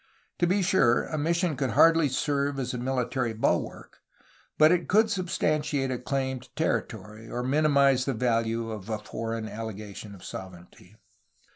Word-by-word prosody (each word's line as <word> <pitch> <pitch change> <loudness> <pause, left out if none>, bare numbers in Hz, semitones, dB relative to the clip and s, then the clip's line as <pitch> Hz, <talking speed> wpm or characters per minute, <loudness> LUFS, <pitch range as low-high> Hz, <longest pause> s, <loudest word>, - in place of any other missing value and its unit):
To 175 - +3
be 190 +2 +2
sure, 150 -10 +3
a 155 - -4
mission 170 +1 0
could 135 -1 -1
hardly 165 -3 +6
serve 140 +1 -1
as 130 -2 -3
a 125 - -3
military 125 -1 -1
bulwark, 110 - -2 0.6
but 155 +1 +6
it 180 -1 +1
could 220 +2 +4
sub 185 -3 -2
stantiate 150 -5 0
a 125 - -4
claim 130 0 -2
to - - -17
territory, 110 +1 -3
or 125 - -3
minimize 140 -1 +3
the 135 - -1
value 115 -1 0
of 105 -1 -7
a 110 - -1
foreign 115 +1 -5
allegation 105 -2 -7
of 90 - -15
sovereignty. 90 +1 -10
130 Hz, 160 wpm, -27 LUFS, 115-150 Hz, 0.6 s, hardly